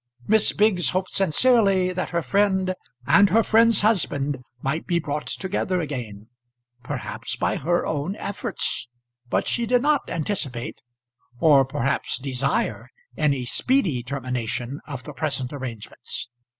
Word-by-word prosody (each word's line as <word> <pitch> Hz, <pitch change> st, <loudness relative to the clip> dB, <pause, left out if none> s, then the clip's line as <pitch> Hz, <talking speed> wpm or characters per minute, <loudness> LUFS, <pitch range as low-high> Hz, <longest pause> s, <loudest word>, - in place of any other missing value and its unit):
Miss 220 Hz, 0 st, +4 dB
Biggs 200 Hz, -5 st, +3 dB
hoped 185 Hz, 0 st, -1 dB
sincerely 195 Hz, -1 st, +3 dB
that 185 Hz, 0 st, -3 dB
her 170 Hz, -1 st, -1 dB
friend 190 Hz, -1 st, +2 dB, 0.3 s
and 200 Hz, +9 st, +6 dB
her 225 Hz, +5 st, +4 dB
friend's 230 Hz, 0 st, +4 dB
husband 145 Hz, -, +1 dB, 0.2 s
might 155 Hz, +5 st, -2 dB
be 175 Hz, -, +2 dB
brought 150 Hz, -2 st, -3 dB
together 190 Hz, -1 st, -1 dB
again; 120 Hz, -10 st, -5 dB, 0.6 s
perhaps 125 Hz, -, -4 dB
by -, -, 0 dB
her 175 Hz, +4 st, 0 dB
own 150 Hz, +6 st, -2 dB
efforts; 200 Hz, -, -2 dB, 0.4 s
but -, -, +1 dB
she 235 Hz, -1 st, -1 dB
did 245 Hz, +2 st, +3 dB
not 295 Hz, -1 st, +2 dB
anticipate, 150 Hz, -, -3 dB, 0.6 s
or 140 Hz, -3 st, +6 dB
perhaps 135 Hz, 0 st, -1 dB
desire 135 Hz, -, -2 dB, 0.3 s
any 140 Hz, -4 st, +1 dB
speedy 180 Hz, -, +1 dB
termination 125 Hz, 0 st, -3 dB
of 140 Hz, -4 st, -6 dB
the 150 Hz, -, -8 dB
present 140 Hz, -3 st, -2 dB
arrangements. 120 Hz, -5 st, -6 dB
160 Hz, 130 wpm, -24 LUFS, 135-200 Hz, 0.6 s, and